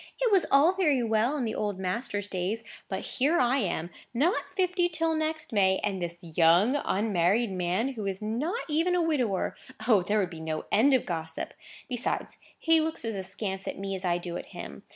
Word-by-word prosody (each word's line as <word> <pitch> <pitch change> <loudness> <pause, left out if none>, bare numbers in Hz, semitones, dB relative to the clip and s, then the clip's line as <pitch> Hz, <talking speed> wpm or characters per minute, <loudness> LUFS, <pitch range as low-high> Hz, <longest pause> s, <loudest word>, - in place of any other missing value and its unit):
It - - +2
was 385 -4 +4
all 290 +6 +5
very 300 -10 +2
well 225 +5 +1
in 255 - -1
the 220 - -2
old 205 -2 -2
master's 205 +2 -2
days. 200 +4 -2 0.3
But - - -2
here 290 +6 +1
am - - +3
I, 235 -10 +1 0.3
not 315 +10 +1
fifty 360 -2 +1
till 325 -1 0
next 315 -4 -2
May, 190 -2 +4
and 190 -3 -1
this 170 0 -4
young, 170 - +4
unmarried 200 +2 +2
man, 185 +6 0
who 220 -7 -4
is 190 -1 -2
not 275 - -2
even 330 +3 +2
a 355 - +2
widower! 250 - 0 0.3
O, 215 -6 +6
there 205 +4 0
would 190 -4 0
be 165 - -8
no 155 -1 -3
end 265 +6 +5
of 255 - 0
gossip. 160 -2 -4 0.3
Besides 245 -1 -3 0.2
he 325 -1 +4
looks 320 -5 -3
as 225 - -1
askance 195 0 -4
at - - -4
me 195 0 -4
as 190 0 -4
I 175 -1 +2
do 175 0 -5
at - - -8
him. - - -8
220 Hz, 200 wpm, -28 LUFS, 185-300 Hz, 0.3 s, O